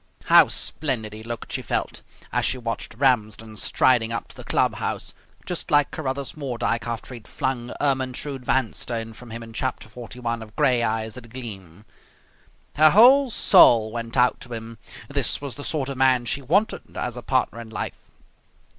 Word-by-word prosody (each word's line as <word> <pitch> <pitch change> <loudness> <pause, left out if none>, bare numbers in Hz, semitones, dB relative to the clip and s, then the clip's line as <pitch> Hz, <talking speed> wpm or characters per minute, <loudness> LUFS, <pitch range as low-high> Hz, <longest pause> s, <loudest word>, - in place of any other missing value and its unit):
How - - +7
splendid 120 -8 -1
he 110 - -9
looked, 115 +1 -7
she - - -2
felt, - - -3 0.3
as - - +1
she 130 - 0
watched 115 -2 -4
Ramsden 110 -4 +1
striding 115 0 +2
up 115 - -3
to - - -12
the - - -10
club - - +1
house - - -3 0.3
just 180 - -3
like 145 -1 +3
Carruthers 140 -2 -4
Mordyke 120 -5 -2
after 120 +2 -5
he 120 - -7
had 110 - -20
flung 125 -2 -3
Ermyntrude 135 0 -1
Vanstone 115 -2 -1
from 120 +1 -13
him 115 +1 -7
in 115 0 -11
chapter 110 - -3
forty 120 +2 -10
one 115 -1 -2
of 110 -1 -12
"Gray 130 -5 +3
Eyes 110 -1 -1
That 125 -2 -11
Gleam". 105 -6 -8 0.9
Her 155 +1 +8
whole 255 - +7
soul 115 - +6
went 115 +1 -5
out 125 0 +3
to 120 - -8
him. 115 0 -7 0.3
This - - -1
was 140 -3 -5
the 145 - -8
sort 145 -4 -2
of 140 -1 -5
man 130 -2 +3
she 140 +5 -2
wanted 190 - 0
as - - -3
a - - -6
partner 115 - 0
in 115 - -10
life. 110 - -5
120 Hz, 180 wpm, -24 LUFS, 115-135 Hz, 0.9 s, Her